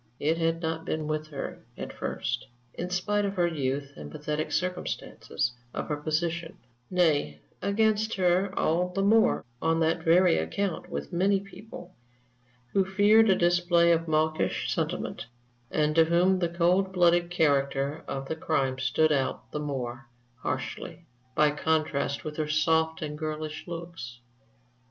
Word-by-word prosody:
It 160 Hz, +3 st, +1 dB
had 165 Hz, +1 st, 0 dB
not 160 Hz, 0 st, -2 dB
been 155 Hz, -1 st, -2 dB
with 155 Hz, 0 st, -2 dB
her 145 Hz, -3 st, -6 dB
at -, -, -6 dB
first, -, -, -3 dB, 0.3 s
in 180 Hz, -, -4 dB
spite 205 Hz, +3 st, 0 dB
of 200 Hz, 0 st, -2 dB
her 175 Hz, -2 st, +2 dB
youth 140 Hz, -4 st, -2 dB
and -, -, -9 dB
the -, -, -7 dB
pathetic 150 Hz, +1 st, -3 dB
circumstances 180 Hz, -8 st, -2 dB, 0.2 s
of -, -, -4 dB
her 150 Hz, -, -1 dB
position; 165 Hz, +2 st, -2 dB, 0.3 s
nay, 150 Hz, -, +2 dB, 0.2 s
against 220 Hz, +2 st, +1 dB
her 185 Hz, +1 st, +2 dB
all 175 Hz, +3 st, +1 dB
the 195 Hz, +2 st, -1 dB
more 220 Hz, -, +4 dB, 0.2 s
on 165 Hz, 0 st, +2 dB
that 165 Hz, +1 st, +1 dB
very 170 Hz, -, +5 dB
account 180 Hz, -, -2 dB
with 70 Hz, 0 st, -5 dB
many 195 Hz, +3 st, +3 dB
people, 195 Hz, -2 st, -11 dB, 0.8 s
who 195 Hz, -, +4 dB
feared 205 Hz, +3 st, +5 dB
a 190 Hz, -, +6 dB
display 175 Hz, -1 st, +3 dB
of 165 Hz, 0 st, +1 dB
mawkish 155 Hz, 0 st, 0 dB
sentiment, 115 Hz, -, -3 dB, 0.4 s
and 150 Hz, 0 st, +1 dB
to 165 Hz, +1 st, +5 dB
whom 180 Hz, +3 st, +3 dB
the 170 Hz, -2 st, 0 dB
cold 180 Hz, +3 st, +2 dB
blooded 175 Hz, -1 st, +3 dB
character 140 Hz, -2 st, +1 dB
of 135 Hz, 0 st, -4 dB
the 160 Hz, -, -2 dB
crime 135 Hz, -5 st, 0 dB
stood 135 Hz, +4 st, +2 dB
out 135 Hz, -3 st, -1 dB
the 150 Hz, -, -3 dB
more 130 Hz, -4 st, -4 dB, 0.3 s
harshly, 165 Hz, +6 st, -5 dB, 0.3 s
by 150 Hz, -1 st, +4 dB
contrast 150 Hz, -2 st, 0 dB
with 150 Hz, -1 st, -5 dB
her 155 Hz, -1 st, -1 dB
soft 160 Hz, +1 st, +2 dB
and 150 Hz, 0 st, -5 dB
girlish 155 Hz, 0 st, -4 dB
looks. 165 Hz, -8 st, -7 dB
165 Hz, 150 wpm, -28 LUFS, 150-180 Hz, 0.8 s, a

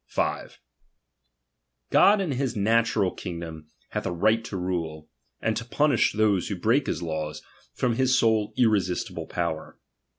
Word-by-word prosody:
5. -, -, -2 dB, 1.3 s
God 205 Hz, +1 st, +6 dB
in 180 Hz, -6 st, -1 dB
his 130 Hz, -1 st, -1 dB
natural 110 Hz, -2 st, +2 dB
kingdom 85 Hz, -4 st, -7 dB, 0.2 s
hath -, -, -3 dB
a -, -, -2 dB
right 110 Hz, +6 st, +2 dB
to 95 Hz, -, -5 dB
rule, 85 Hz, -4 st, -3 dB, 0.3 s
and 110 Hz, -, 0 dB
to 115 Hz, -, -3 dB
punish 140 Hz, +1 st, +2 dB
those 105 Hz, -4 st, +2 dB
who 100 Hz, -, -2 dB
break 115 Hz, +9 st, +1 dB
his -, -, -2 dB
laws, 80 Hz, -2 st, -4 dB, 0.3 s
from 120 Hz, -2 st, 0 dB
his 130 Hz, 0 st, +3 dB
sole 110 Hz, -3 st, +2 dB
irresistible 105 Hz, -7 st, 0 dB
power. 85 Hz, -3 st, -3 dB
105 Hz, 140 wpm, -26 LUFS, 85-115 Hz, 1.3 s, God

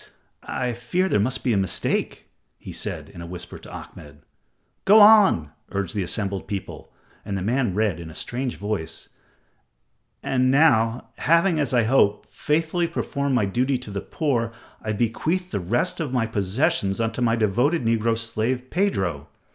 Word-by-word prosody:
"I 125 Hz, -2 st, -3 dB
fear 125 Hz, +11 st, -1 dB
there 145 Hz, -, +2 dB
must 120 Hz, +6 st, 0 dB
be 125 Hz, -, +2 dB
a -, -, +2 dB
mistake," 95 Hz, -1 st, -1 dB, 0.3 s
he -, -, -10 dB
said, -, -, -4 dB
in 85 Hz, -, -11 dB
a 85 Hz, -, -7 dB
whisper 90 Hz, 0 st, -7 dB
to -, -, -12 dB
Ahmed. 75 Hz, 0 st, -11 dB, 0.6 s
"Go 210 Hz, +3 st, +7 dB
on," 205 Hz, -, +6 dB, 0.2 s
urged 100 Hz, -2 st, -3 dB
the 105 Hz, -, -1 dB
assembled 100 Hz, +1 st, -2 dB
people, 100 Hz, -2 st, -6 dB, 0.3 s
and 100 Hz, -, -3 dB
the 95 Hz, -, -3 dB
man 120 Hz, -2 st, 0 dB
read 105 Hz, -5 st, +1 dB
in 85 Hz, -1 st, -8 dB
a 80 Hz, -, -12 dB
strange 125 Hz, +5 st, -3 dB
voice: 100 Hz, -6 st, -4 dB, 1.1 s
"And 130 Hz, -1 st, +2 dB
now, 125 Hz, -5 st, +3 dB
having 170 Hz, +1 st, +3 dB
as 145 Hz, -4 st, 0 dB
I 120 Hz, -2 st, +3 dB
hope, 110 Hz, -3 st, +2 dB
faithfully 165 Hz, +3 st, 0 dB
performed 140 Hz, -4 st, -2 dB
my 110 Hz, -, +2 dB
duty 125 Hz, +7 st, 0 dB
to 125 Hz, -4 st, -9 dB
the 100 Hz, -1 st, -3 dB
poor, 120 Hz, -3 st, -1 dB, 0.3 s
I 110 Hz, -, -3 dB
bequeath 155 Hz, -, -1 dB
the -, -, -1 dB
rest 120 Hz, -, 0 dB
of 155 Hz, -6 st, -2 dB
my 125 Hz, -3 st, +1 dB
possessions 110 Hz, -, 0 dB
unto 115 Hz, +2 st, -1 dB
my 115 Hz, -1 st, +3 dB
devoted 120 Hz, -, +1 dB
negro 115 Hz, 0 st, +1 dB
slave, 115 Hz, +3 st, -2 dB
Pedro." 95 Hz, -, 0 dB
115 Hz, 165 wpm, -24 LUFS, 100-140 Hz, 1.1 s, Go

